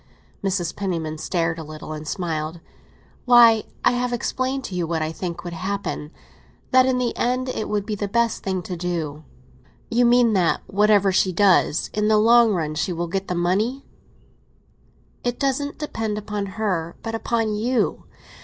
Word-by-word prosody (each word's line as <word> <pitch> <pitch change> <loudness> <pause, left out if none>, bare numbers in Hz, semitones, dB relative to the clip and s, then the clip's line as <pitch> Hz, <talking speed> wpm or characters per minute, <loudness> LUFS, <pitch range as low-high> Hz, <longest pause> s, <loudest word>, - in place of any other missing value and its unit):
Mrs. 185 -4 -1
Penniman 165 -6 -3
stared 165 -1 -1
a - - -5
little, 155 0 -8
and 155 0 -7
smiled. 165 -2 -3 0.7
"Why, 235 -3 +7 0.2
I - - +6
have 245 0 -1
explained 260 +2 -2
to 195 - -6
you 175 -2 -1
what 160 -1 -1
I 155 - -2
think 170 +1 -5
would 175 -1 -6
happen—that 195 - -2
in 260 -1 +2
the 250 -1 -1
end 255 +1 0
it 220 - -3
would 205 -1 -1
be 215 - -3
the 205 0 -2
best 235 +2 0
thing 190 -2 -2
to 180 - -5
do." 165 -4 -3 0.7
"You 240 +1 +3
mean 240 -1 +5
that, 180 -4 +2
whatever 205 -1 +3
she 185 0 +2
does, 185 -3 +3
in 210 0 +1
the 215 0 +4
long 230 +1 +6
run 160 -6 -1
she 155 +4 -1
will 175 0 -2
get 195 +3 -3
the 180 - -2
money?" 205 +10 0 1.4
"It 245 0 -1
doesn't 280 +1 -1
depend 225 -8 -3
upon 210 -1 -4
her, 175 -6 -1
but 225 - -4
upon 225 -1 -1
you. 235 +4 0
200 Hz, 170 wpm, -23 LUFS, 170-235 Hz, 1.4 s, Why